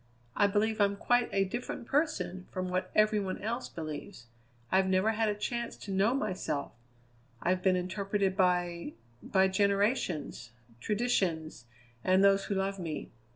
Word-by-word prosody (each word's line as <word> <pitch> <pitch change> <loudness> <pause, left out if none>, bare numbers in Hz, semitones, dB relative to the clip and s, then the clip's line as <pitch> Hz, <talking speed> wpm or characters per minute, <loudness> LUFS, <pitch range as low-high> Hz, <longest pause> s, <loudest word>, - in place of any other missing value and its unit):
I 205 - +4
believe 215 +1 +1
I'm 200 0 +3
quite 245 +4 +2
a 195 0 +2
different 240 +4 -5
person 185 - -1
from 185 0 -3
what 185 +1 -1
every 215 0 +4
one 190 -2 -3
else 230 +4 -3
believes; 155 -7 -7 0.5
I've 190 0 +4
never 190 +3 +3
had 220 0 +1
a 210 - 0
chance 235 +3 -3
to 200 - -8
know 200 +6 +2
myself; 185 - -2 0.7
I've 185 +5 0
been 185 0 +3
interpreted 195 +1 -1
by 175 -4 +1 0.3
by 190 -1 +3
generations, 195 - 0 0.3
traditions, 175 - -1 0.4
and 185 +1 +4
those 195 0 +4
who 200 - -2
love 195 0 -1
me. 160 -4 -5
195 Hz, 150 wpm, -31 LUFS, 180-210 Hz, 0.7 s, I